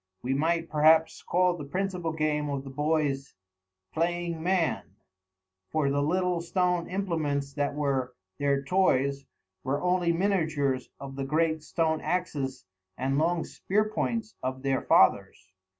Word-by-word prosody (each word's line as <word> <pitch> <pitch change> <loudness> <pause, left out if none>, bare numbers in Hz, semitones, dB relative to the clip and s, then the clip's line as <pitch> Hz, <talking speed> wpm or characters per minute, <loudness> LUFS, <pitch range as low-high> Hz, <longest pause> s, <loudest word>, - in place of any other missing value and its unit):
We 130 +2 0
might, 165 +4 +1
perhaps, 160 +1 +4
call 180 0 +2
the 155 - -7
principal 180 +2 -2
game 155 -1 -1
of 140 -1 -3
the 135 - -8
boys 145 -1 -1 0.6
"Playing 170 0 -1
Man," 175 -1 +1 0.9
for 150 -3 +1
the 145 0 +1
little 180 +3 +1
stone 180 0 0
implements 155 -7 -2
that 145 0 -1
were 135 -4 -1 0.2
their 140 -1 +1
toys 140 -5 +1 0.4
were 135 +2 -1
only 180 0 +2
miniatures 160 -8 0
of 135 0 -8
the 135 - -2
great 155 +3 +1
stone 160 0 0
axes 145 - -2 0.3
and 135 +2 0
long 165 +1 +1
spear 210 +3 0
points 220 0 -2
of 130 +1 -4
their 135 -1 +1
fathers. 95 0 +3
155 Hz, 135 wpm, -28 LUFS, 140-175 Hz, 0.9 s, perhaps